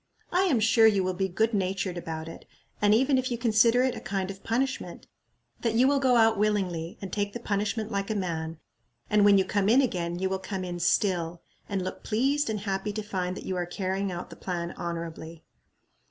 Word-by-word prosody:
I 365 +2 +3
am 285 -11 +2
sure 225 +1 +5
you 200 -3 +3
will 185 0 -1
be 190 +1 -1
good 220 +5 0
natured 190 -2 -1
about 160 -2 -5
it, 165 - -10 0.4
and 205 0 +4
even 260 +3 +3
if 255 - -2
you 240 - -2
consider 230 +1 +4
it 260 -1 +1
a - - -5
kind 195 -1 -3
of 195 - -12
punishment, 260 +4 -2 0.6
that 230 -2 0
you 250 +3 +5
will 280 0 +3
go 260 -2 +3
out 225 -2 +4
willingly, 185 -6 0
and 190 - -6
take 205 -1 -1
the 240 - -5
punishment 210 0 -2
like 200 +1 -2
a 220 - -1
man; 165 -4 -3 0.5
and 210 -1 +5
when 200 -1 +7
you 190 - +3
come 205 -1 +1
in 245 +4 +6
again 175 -10 0
you 190 +1 0
will 190 0 -2
come 190 0 -4
in 175 -1 -5
still, 175 -1 0 0.3
and 195 -2 -1
look 185 - -5
pleased 270 +5 +1
and 215 -2 -2
happy 200 +1 -2
to 215 +1 -4
find 185 -2 -3
that - - -8
you 185 - -2
are 175 -1 -2
carrying 190 +2 -2
out 175 0 -6
the - - -9
plan 175 -2 -4
honorably." 165 -1 -6
200 Hz, 220 wpm, -27 LUFS, 180-225 Hz, 0.6 s, when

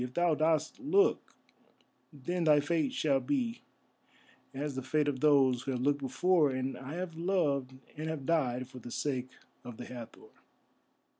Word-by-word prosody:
If 125 0 -7
thou 175 -1 +3
dost 155 - +1
look, 385 +9 +2 0.8
then 170 +4 -3
thy 150 -2 +6
fate 150 0 0
shall 140 -3 +1
be 245 - -2 0.9
as 145 +2 -4
the 130 - -4
fate 145 +3 0
of 140 -3 -1
those 135 -4 +4
who 135 - -3
have 125 - -2
looked 145 +1 +1
before, 160 +3 +2
and 130 0 -2
have 165 +6 -6
loved 150 -7 0 0.2
and 155 +1 -4
have 155 -4 -4
died 130 -6 0
for 130 -1 -11
the 120 - -9
sake 130 0 -2 0.3
of 120 -2 -9
the 125 - -7
Hathor." 120 -3 -10
145 Hz, 160 wpm, -31 LUFS, 130-165 Hz, 0.9 s, thy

